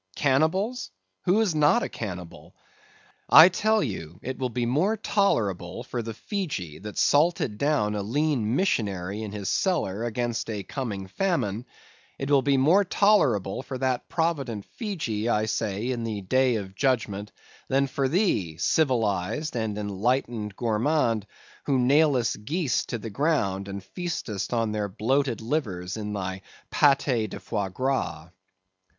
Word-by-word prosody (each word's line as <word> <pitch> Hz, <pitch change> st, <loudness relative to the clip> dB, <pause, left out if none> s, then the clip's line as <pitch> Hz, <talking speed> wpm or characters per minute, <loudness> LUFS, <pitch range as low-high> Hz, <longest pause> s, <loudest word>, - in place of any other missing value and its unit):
Cannibals? 160 Hz, -, +1 dB, 0.4 s
who 190 Hz, +5 st, +4 dB
is 205 Hz, -6 st, +1 dB
not 155 Hz, +10 st, +4 dB
a -, -, -1 dB
cannibal? 90 Hz, -6 st, -8 dB, 0.7 s
I 165 Hz, +3 st, +10 dB
tell 215 Hz, +3 st, +2 dB
you 85 Hz, -, -5 dB
it 130 Hz, +1 st, -5 dB
will 130 Hz, -1 st, -1 dB
be 120 Hz, +1 st, -1 dB
more 165 Hz, -, +1 dB
tolerable 115 Hz, -, 0 dB
for 120 Hz, -1 st, -4 dB
the 115 Hz, -1 st, -6 dB
Fejee 140 Hz, -, -4 dB
that 105 Hz, 0 st, -8 dB
salted 145 Hz, -8 st, +2 dB
down 140 Hz, -8 st, +1 dB
a 105 Hz, -, -2 dB
lean 125 Hz, 0 st, 0 dB
missionary 100 Hz, -, -1 dB
in 110 Hz, -2 st, -5 dB
his 100 Hz, -2 st, -5 dB
cellar 115 Hz, -, 0 dB
against 120 Hz, 0 st, -2 dB
a 105 Hz, -3 st, -3 dB
coming 105 Hz, -4 st, -4 dB
famine; 120 Hz, -, -1 dB, 0.5 s
it 135 Hz, +1 st, -3 dB
will 140 Hz, -2 st, +5 dB
be 140 Hz, 0 st, +2 dB
more 165 Hz, +10 st, +5 dB
tolerable 145 Hz, -, +2 dB
for 130 Hz, 0 st, -6 dB
that 130 Hz, -1 st, -1 dB
provident 140 Hz, -, -1 dB
Fejee, 125 Hz, -, -3 dB
I 110 Hz, -2 st, +2 dB
say, 110 Hz, +1 st, -2 dB
in 120 Hz, -2 st, -3 dB
the 110 Hz, -3 st, -3 dB
day 130 Hz, +5 st, +2 dB
of 95 Hz, -3 st, -5 dB
judgment, 105 Hz, -4 st, -1 dB, 0.4 s
than 135 Hz, +1 st, +2 dB
for 135 Hz, 0 st, -1 dB
thee, 130 Hz, -, +1 dB
civilized 115 Hz, -, 0 dB
and 110 Hz, -3 st, -2 dB
enlightened 105 Hz, +1 st, -1 dB
gourmand, 115 Hz, -1 st, +1 dB, 0.4 s
who 140 Hz, -2 st, +3 dB
nailest 130 Hz, -4 st, +3 dB
geese 155 Hz, +1 st, 0 dB
to 120 Hz, -, -3 dB
the 115 Hz, 0 st, -7 dB
ground 100 Hz, -8 st, 0 dB
and 100 Hz, -1 st, -6 dB
feastest 125 Hz, -, -4 dB
on 115 Hz, -2 st, 0 dB
their 105 Hz, -1 st, -2 dB
bloated 125 Hz, +5 st, 0 dB
livers 105 Hz, -, -2 dB
in 105 Hz, -1 st, -4 dB
thy 95 Hz, -1 st, -4 dB, 0.3 s
paté 135 Hz, -6 st, +3 dB
de -, -, -7 dB
foie 100 Hz, -2 st, -3 dB
gras. 130 Hz, -, -2 dB
120 Hz, 145 wpm, -26 LUFS, 105-145 Hz, 0.7 s, I